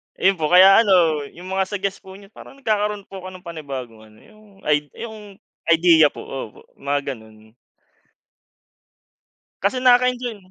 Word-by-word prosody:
Ayun 190 -2 +1
po, 155 - 0
kaya 185 +4 +7
ano 170 -9 +3
yung 180 +2 -10
mga 190 0 0
suggest 200 -1 -4
po 190 0 -13
niyo 200 +1 -16
parang 270 - -14
nagkakaro'n 210 -3 -1
po 195 - -10
ko 185 - -9
ng 185 -1 -11
panibagong 135 - -8
ano, 110 0 -21
yung 215 0 -20 0.2
id 150 -1 +1 0.2
yung 215 -3 -10 0.3
ideya 165 -2 +5
po. - - -9
Opo, 130 -5 -8 0.2
mga 140 0 -2
ganun. 110 -2 -17 2.1
Kasi 260 - 0
nakaka-enjoy. 250 -2 +2
185 Hz, 150 wpm, -21 LUFS, 145-205 Hz, 2.1 s, kaya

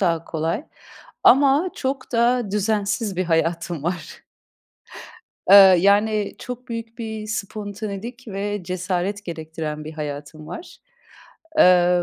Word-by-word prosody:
daha 165 -4 +1
kolay. 165 - -2 0.6
Ama 280 +6 +5
çok 265 -1 -4
da 235 -2 +2
düzensiz 210 0 -1
bir 185 - 0
hayatım 165 -1 -1
var. 170 0 -5 1.3
Eee, 200 - +10 0.2
yani, 205 +2 +2
çok 250 +1 -8
büyük 230 0 -6
bir 220 -2 -5
spontanelik 215 +2 -5
ve 205 0 -3
cesaret 185 +3 -2
gerektiren 160 -3 -5
bir 155 - -7
hayatım 150 0 -7
var. 180 - -9 0.8
Eee, 180 - +5
200 Hz, 110 wpm, -22 LUFS, 170-220 Hz, 1.3 s, Eee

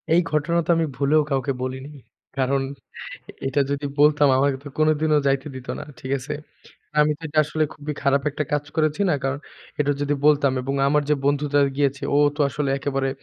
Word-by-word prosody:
এই 175 - +5
ঘটনা 155 +3 +1
তো - - -15
আমি 165 0 +1
ভুলেও 150 +2 +3
কাউকে 135 0 0
বলিনি। 130 +2 -4 0.5
কারণ 135 +1 +1 0.9
এটা 135 +2 +1
যদি 140 +1 -2
বলতাম 145 0 +5
আমাকে 135 0 +2
তো - - -8
কোনদিনও 155 0 +3
যাইতে 135 +1 +1
দিত 130 0 -9
না। - - -6 0.2
ঠিক 130 +1 -6
আছে? 140 +4 -5 0.7
আমি 150 0 +4
তো - - -23
এটা 155 +1 -2
আসলে 155 +1 0
খুবই 150 +1 -5
খারাপ 140 0 +2
একটা 150 +1 -3
কাজ 145 0 0
করেছি 155 +3 +1
না? - - +3
কারণ 135 +1 -1 0.4
এটা 145 0 +2
যদি 145 0 0
বলতাম 145 -3 +4
এবং 135 +2 -3
আমার 150 +1 +2
যে - - +5
বন্ধুটা 145 0 +2 0.2
গিয়েছে 140 -1 0
ও - - +4 0.2
তো - - -5
আসলে 145 0 -2
একেবারে 135 -1 -1
145 Hz, 190 wpm, -23 LUFS, 135-150 Hz, 0.9 s, এই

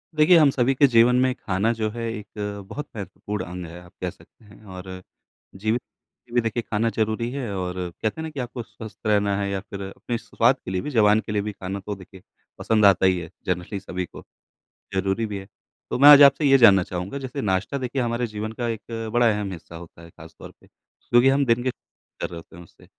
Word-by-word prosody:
देखिए, 155 +3 +6
हम 150 -3 +6
सभी 130 +1 +2
के 140 - +5
जीवन 120 0 +5
में 130 0 +3
खाना 100 +4 0
जो 110 -2 -2
है 115 +1 -6
एक 105 -2 -8 0.4
बहुत 150 0 -6
महत्वपूर्ण 100 +1 -5
अंग 90 +1 -7
है, 85 +1 -10
आप 90 - -16
कह - - -1
सकते 110 - -19
हैं। 105 +1 -17
और 95 -2 -9 0.7
जीवित 110 +5 -1 0.5
ए - - -17
भी 120 - +4
देखिए 115 +1 -2
खाना 115 +1 -1
ज़रूरी 110 +2 -1
है, 130 -5 -4
और 90 -1 -3 0.3
कहते 110 +8 -1
हैं - - -3
ना 160 - -5
कि 145 -3 -6
आपको 125 0 -5
स्वस्थ 110 -1 -11
रहना 100 -1 +2
है 100 0 -1
या 100 -1 -2
फिर 100 0 -8
अपने 105 +5 -5
स - - -16
स्वाद - - +4
के - - -6
लिए 95 -1 -1
भी, 150 - -5
ज़ुबान 110 -4 +4
के 105 - -7
लिए 105 -1 0
भी, 105 +1 -4
खाना 95 0 -6
तो 105 - -3
देखिए 95 -1 -14 0.4
पसंद 110 -2 +2
आता 95 -1 +5
ही 95 -1 +3
है, 85 -2 -7 0.2
जनरली 90 +2 -2
सभी 90 -1 -4
को, - - -12 0.7
ज़रूरी 95 +4 0
भी 105 -2 -4
है। 95 - -11 0.4
तो - - -2
मैं 145 +2 +9
आज 145 -1 +10
आपसे 140 +2 +5
ये 135 -1 +6
जानना 100 -7 +7
चाहूँगा, 90 +8 -5
जैसे 135 0 -5
नाश्ता 100 +5 -1
देखिए 130 +2 -2
हमारे 120 0 -1
जीवन 110 0 -5
का 120 - -1
एक 115 0 -5
बड़ा 120 -1 +4
अहम 105 -2 -3
हिस्सा 85 -1 -10
होता 85 0 -12
है 85 - -13
ख़ासतौर - - -13
पे, - - -21
क्योंकि 120 +2 +1
हम 140 +1 +2
दिन 120 0 +2
के 130 - +1
कर - - -10
रहे 85 - -8
होते 80 - -13
हैं 85 - -11
उससे। 85 - -20
110 Hz, 235 wpm, -24 LUFS, 95-120 Hz, 0.7 s, आज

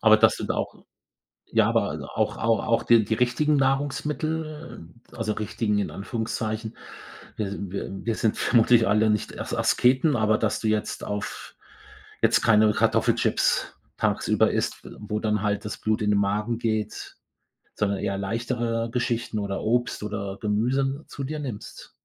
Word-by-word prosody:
Aber 110 -1 +7
das - - +4
sind - - -5
auch - - -2 0.8
ja, - - +3
aber - - +1
a - - -4 0.2
auch - - +1
au 115 -1 +2
auch 115 - +1
die 115 -3 +5
die 110 - 0
richtigen 135 +6 +2
Nahrungsmittel, 150 - -2 0.3
also, 110 -2 -2
richtigen 105 0 -1
in 100 - -2
Anführungszeichen. 110 +1 -4 0.6
Wir 105 - -1
s 100 - -5
wir 100 0 -4 0.2
wir 115 - 0
sind 110 -1 0
vermutlich 115 -1 +4
alle 105 +2 +3
nicht 105 -1 0
Ers - - -4
Asketen, 130 +4 +3
aber 110 0 +3
dass 110 - 0
du 110 - -2
jetzt 110 -1 -1
auf 105 0 -5 0.7
jetzt - - +4
keine 110 -1 +5
Kartoffelchips - - +2 0.2
tagsüber - - +2
isst, - - -2
wo 105 0 -3
dann 105 -2 0
halt 105 -1 -1
das 105 - -4
Blut 110 +1 0
in 105 0 +2
den 100 - +3
Magen 105 +3 0
geht, 110 -2 -3 0.6
sondern 100 -1 0
eher 100 -1 -2
leichtere 115 +3 -2
Geschichten 120 -2 -1
oder 100 -1 -3
Obst 120 +2 0
oder 100 -2 -4
Gemüse 135 +7 0
zu 140 - -7
dir 150 +3 -4
nimmst? 125 -8 -7
110 Hz, 160 wpm, -25 LUFS, 105-125 Hz, 0.8 s, Aber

